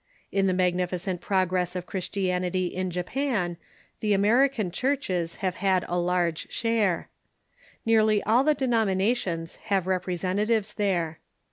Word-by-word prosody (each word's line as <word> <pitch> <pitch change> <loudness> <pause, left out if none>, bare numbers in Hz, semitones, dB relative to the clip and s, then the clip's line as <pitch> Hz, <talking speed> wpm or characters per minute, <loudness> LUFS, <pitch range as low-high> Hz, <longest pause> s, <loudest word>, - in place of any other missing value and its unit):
In 195 -1 +2
the 185 - +2
magnificent 180 0 0
progress 185 -2 0
of 180 -1 -3
Christianity 185 -1 -1
in 185 +1 -2
Japan 180 0 -1 0.4
the 210 -1 +1
American 220 +1 +3
cliurches 185 - -1
have 185 - -1
had 190 -1 +1
a 175 - -2
large 175 -2 0
share. 225 -6 0 0.8
Nearly 215 -2 +4
all 230 +5 +4
the 305 +1 +3
denomina 225 -5 +2
tions 165 -7 -4
have 195 -3 +1
representatives 190 +4 0
there. 175 -6 -1
190 Hz, 125 wpm, -26 LUFS, 180-215 Hz, 0.8 s, Nearly